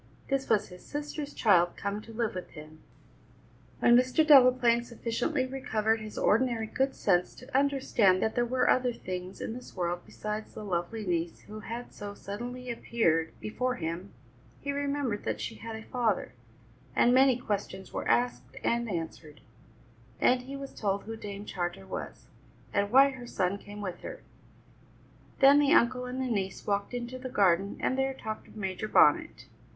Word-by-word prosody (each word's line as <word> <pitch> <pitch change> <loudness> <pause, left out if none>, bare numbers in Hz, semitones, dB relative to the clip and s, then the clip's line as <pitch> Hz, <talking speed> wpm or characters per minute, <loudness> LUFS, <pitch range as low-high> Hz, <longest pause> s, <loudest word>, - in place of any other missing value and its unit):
This 275 -1 0
was 210 -2 +2
his 180 -1 -12
sister's 295 0 -5
child 175 -6 +3
come 200 +1 -3
to 225 - -12
live 225 -1 -1
with 185 -1 -6
him! 155 0 -12 1.0
When 240 - +5
Mr. 255 +5 +4
Delaplaine 255 -4 +6
sufficiently 240 +4 -1
recovered 225 -4 0
his 215 -1 -8
ordinary 230 0 +2
good 265 +4 -1
sense 180 -3 +1
to 255 - -11
understand 265 -9 +3
that 220 - 0
there 240 - +2
were 255 +2 +1
other 250 -1 +3
things 185 -2 -6
in 225 - -4
this 250 +1 -10
world 175 -1 -1
besides 215 0 -6
the - - -6
lovely 195 +4 -2
niece 170 -2 -2
who 215 +1 -9
had 235 +3 -7
so 205 0 -7
suddenly 245 +6 -6
appeared 165 -9 0
before 250 +4 -2
him, 170 +2 -4 0.5
he 280 - -3
remembered 280 -6 -1
that - - -2
she - - -4
had 225 0 -7
a 220 - -8
father, 225 - -1 0.6
and 245 - +5
many 260 -1 +5
questions 200 -5 -4
were - - -3
asked 120 +2 0
and 235 0 +1
answered; 160 -4 -5 0.8
and 250 0 +4
he 265 +2 -8
was 275 0 -7
told 200 -2 -1
who 225 +1 -6
Dame 205 -2 -7
Charter 175 - -4
was, - - -7 0.5
and 200 0 +1
why 270 +4 +6
her 250 -2 -9
son 195 -2 -1
came 205 +1 -9
with 185 -3 -5
her. - - -8 1.2
Then 280 +1 +8
the 290 +2 +4
uncle 250 -1 +3
and 250 +1 -5
the 260 - 0
niece 200 -6 -2
walked 200 +3 -1
into 245 +1 -5
the 255 0 -6
garden, 195 -3 +2
and 260 - 0
there 265 0 0
talked 215 -3 -6
of - - -17
Major 195 +1 -3
Bonnet. 135 - +4
220 Hz, 170 wpm, -29 LUFS, 190-255 Hz, 1.2 s, Then